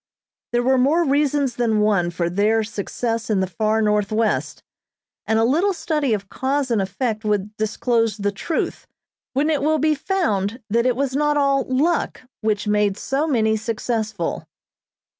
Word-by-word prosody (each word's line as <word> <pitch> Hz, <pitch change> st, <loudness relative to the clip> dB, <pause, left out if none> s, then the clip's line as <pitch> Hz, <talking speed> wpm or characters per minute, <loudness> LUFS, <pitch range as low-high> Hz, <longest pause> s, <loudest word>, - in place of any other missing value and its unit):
There 240 Hz, 0 st, +1 dB
were 260 Hz, +1 st, +3 dB
more 300 Hz, +7 st, +3 dB
reasons 280 Hz, -3 st, +1 dB
than 225 Hz, -3 st, +1 dB
one 200 Hz, -5 st, +2 dB
for 170 Hz, 0 st, -2 dB
their 210 Hz, +5 st, +2 dB
success 225 Hz, +2 st, -3 dB
in 210 Hz, -3 st, +2 dB
the 190 Hz, -, +1 dB
far 215 Hz, +5 st, 0 dB
Northwest, 210 Hz, +1 st, 0 dB, 0.6 s
and 220 Hz, -, +2 dB
a 225 Hz, -, +3 dB
little 335 Hz, -, +2 dB
study 300 Hz, -7 st, -1 dB
of 200 Hz, -1 st, -7 dB
cause 265 Hz, +3 st, -1 dB
and 220 Hz, -4 st, +2 dB
effect 215 Hz, +3 st, -2 dB
would 210 Hz, 0 st, -1 dB
disclose 225 Hz, 0 st, 0 dB
the 205 Hz, -1 st, -1 dB
truth, 310 Hz, -, -3 dB, 0.5 s
when 290 Hz, +4 st, +1 dB
it 295 Hz, -, 0 dB
will 310 Hz, +2 st, +2 dB
be 310 Hz, +1 st, +2 dB
found 230 Hz, -, -1 dB
that 235 Hz, +3 st, +2 dB
it 250 Hz, -, +2 dB
was 270 Hz, 0 st, -1 dB
not 295 Hz, +1 st, +2 dB
all 275 Hz, -1 st, +2 dB
"luck" 295 Hz, +6 st, 0 dB, 0.2 s
which 215 Hz, -1 st, -1 dB
made 210 Hz, -1 st, +2 dB
so 280 Hz, +4 st, -1 dB
many 220 Hz, -6 st, +2 dB
successful. 220 Hz, -3 st, -3 dB
230 Hz, 160 wpm, -21 LUFS, 210-275 Hz, 0.6 s, were